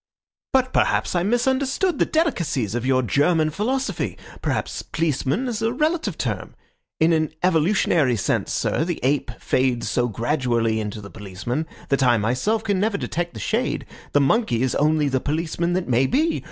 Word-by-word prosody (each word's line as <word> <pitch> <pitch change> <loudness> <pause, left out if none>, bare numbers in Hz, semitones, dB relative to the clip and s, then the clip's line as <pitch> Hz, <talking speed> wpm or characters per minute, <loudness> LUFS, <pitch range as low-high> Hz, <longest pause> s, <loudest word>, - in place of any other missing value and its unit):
"But 255 -1 +2
perhaps - - +2
I 175 - +1
misunderstood 265 - +1
the - - +3
delicacies 170 - 0
of 120 +1 -2
your 130 -1 +3
German 155 +6 +2
philosophy. 255 - -2 0.2
Perhaps - - -2
policeman 155 - -1
is 225 -3 -3
a 225 0 +1
relative 315 +5 0
term. - - -3 0.4
In 165 +1 +4
an 155 -1 +1
evolutionary 165 - +3
sense, 105 - -1
sir, - - 0
the 175 0 -3
ape 135 0 +1
fades 130 -2 0
so 120 0 +1
gradually 115 -1 0
into 105 0 -4
the 100 - -10
policeman, 110 +9 -4 0.2
that 140 0 +2
I 120 -2 +4
myself 130 - 0
can 200 -3 0
never 205 +1 +1
detect 175 -6 -3
the - - -6
shade. - - -1 0.3
The 145 - +4
monkey 135 - +2
is 130 - 0
only 150 0 +2
the 130 -1 +1
policeman 165 +4 -1
that 185 0 -1
may 130 +1 +3
be. 315 - +1
155 Hz, 165 wpm, -23 LUFS, 125-215 Hz, 0.4 s, In